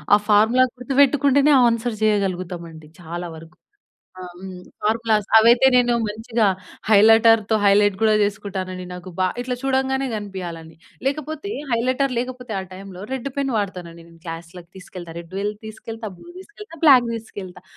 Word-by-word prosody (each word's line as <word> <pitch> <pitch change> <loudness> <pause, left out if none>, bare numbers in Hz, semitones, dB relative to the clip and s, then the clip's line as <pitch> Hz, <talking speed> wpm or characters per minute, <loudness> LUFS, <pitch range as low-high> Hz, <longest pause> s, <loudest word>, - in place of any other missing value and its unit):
ఆ - - +5
formula 225 +5 +5
గుర్తువెట్టుకుంటేనే 280 +2 +3
answer 230 -1 -1
జెయగలుగుతామండి 180 -6 -2
చాలా 175 +1 -6
వరుకు. 165 +2 -14 0.6
ఆహ్! 180 -1 -8
హ్మ్. 185 0 -9 0.3
ఫార్ములాస్. 220 -1 +1
అవైతే 235 +3 +5
నేను 245 -1 +3
మంచిగా 225 +2 -1 0.4
హైలైటర్‌తో 225 +1 +5
హైలైట్ 200 0 +4
గూడా 215 -1 +4
చేసుకుంటానండి. 195 -3 -3
నాకు 180 +1 -9
బా 185 - +3
ఇట్లా 250 0 -3
చూడంగానే 265 0 0
గనిపియాల‌ని, 175 -6 -7 0.3
లేకపోతే 310 +7 -3 0.2
హైలైటర్ 255 +3 0
లేకపోతే 250 -1 -5
ఆ - - -4
టైంలో 190 -1 -10
రెడ్డు 265 +1 -4
పెన్ 275 -2 -1
వాడతానండి 180 -5 -5
నేను 165 0 -19
క్లాస్‌లకి 170 +1 -9
తీసుకెళ్తా. 180 -2 -10
రెడ్ 170 +1 -13
వెల్ 205 +1 -2
తీసుకెళ్తా, 220 0 -8
బ్లూ - - -16
దీసుకెళ్తా, 415 -2 -13
బ్లాక్ 260 -6 +6
దీసుకెళ్తా. 195 -5 -9
215 Hz, 135 wpm, -21 LUFS, 185-250 Hz, 0.6 s, బ్లాక్